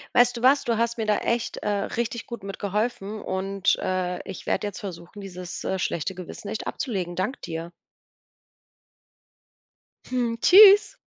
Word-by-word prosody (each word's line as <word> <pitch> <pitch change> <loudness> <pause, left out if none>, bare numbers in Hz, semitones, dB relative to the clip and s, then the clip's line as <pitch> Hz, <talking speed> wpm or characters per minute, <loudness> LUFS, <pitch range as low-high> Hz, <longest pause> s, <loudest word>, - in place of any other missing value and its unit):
Weißt 245 0 +5
du 235 - -7
was? 275 +2 +5
Du 230 -2 0
hast 235 +1 -1
mir 220 - -2
da 210 - +3
echt, 235 0 -1
äh, - - -3
richtig 230 +3 -2
gut 235 -4 -8
mitgeholfen 205 +2 -3
und, 195 0 0
äh, 185 -1 -2
ich 190 - -8
werde 210 - 0
jetzt 205 - -7
versuchen, 185 0 -8
dieses, 180 -2 -7
äh, 190 - -2
schlechte 180 +1 -2
Gewissen 185 +3 -8
echt 220 - -4
abzulegen. 185 -9 -3
Danke 200 +10 -2
dir. 165 +1 -6 2.4
Hm. 245 -2 0
Tschüss! 410 +2 +8
205 Hz, 150 wpm, -25 LUFS, 185-235 Hz, 2.4 s, Tschüss